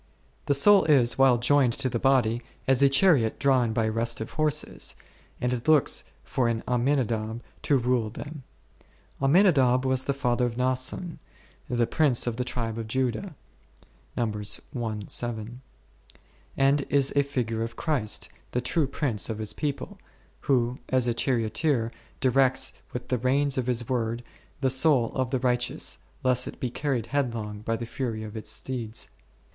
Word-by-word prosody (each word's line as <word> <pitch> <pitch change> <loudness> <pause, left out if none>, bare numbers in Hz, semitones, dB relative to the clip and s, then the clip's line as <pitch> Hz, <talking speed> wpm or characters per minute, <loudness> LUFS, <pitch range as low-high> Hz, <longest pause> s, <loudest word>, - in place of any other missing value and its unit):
The 140 - +3
soul 200 +8 +6
is, 135 -5 +3
while 130 -2 +6
joined 125 0 +3
to 135 +1 0
the 120 -2 -2
body, 120 -3 +2 0.3
as 135 0 +3
a 140 - +6
chariot 135 - +4
drawn 130 -4 +2
by 110 0 0
restive 115 0 -2
horses, 150 -1 -1 0.4
and 125 0 0
it 120 +2 -4
looks 155 -3 +3 0.2
for 125 -2 0
an 115 -1 -1
Amminadab 120 -3 0 0.2
to 140 - +2
rule 120 -3 0
them. 145 +6 -8 0.8
Amminadab 135 -5 +4
was 130 0 +1
the 140 - 0
father 125 -2 +1
of 120 -1 -6
Naasson, 130 +7 -1 0.5
the 120 -1 +2
prince 140 -2 +2
of 120 -2 -2
the 125 - 0
tribe 115 -2 -4
of 115 - -5
Judah 130 - -2 0.8
n, 115 -3 0 2.2
and 140 +1 +3
is 140 -1 +2
a 140 - +5
figure 120 -5 -2
of 115 +1 -4
Christ 135 -10 -2 0.2
the 125 - 0
true 145 +4 0
prince 125 - -1
of 110 - -3
His 110 -1 -3
people, 150 +7 -4 0.4
who, 125 -2 +1
as 130 -2 +2
a 120 - +2
charioteer, 115 +1 0 0.3
directs 130 0 +2 0.2
with 125 0 -6
the 125 - 0
reins 135 +3 +1
of 130 -2 -1
His 120 -2 0
Word, 120 -1 -1 0.4
the 135 - +2
soul 130 -3 +4
of 130 -2 -1
the 130 - 0
righteous, 125 -1 0 0.2
lest 125 -1 +2
it - - -8
be 125 - -2
carried 130 -5 -1
headlong 115 -6 -2
by 115 +2 -2
the 115 +1 -5
fury 115 -2 -4
of 110 0 -8
its 110 -1 -5
steeds. 115 0 -3
125 Hz, 155 wpm, -26 LUFS, 115-135 Hz, 2.2 s, soul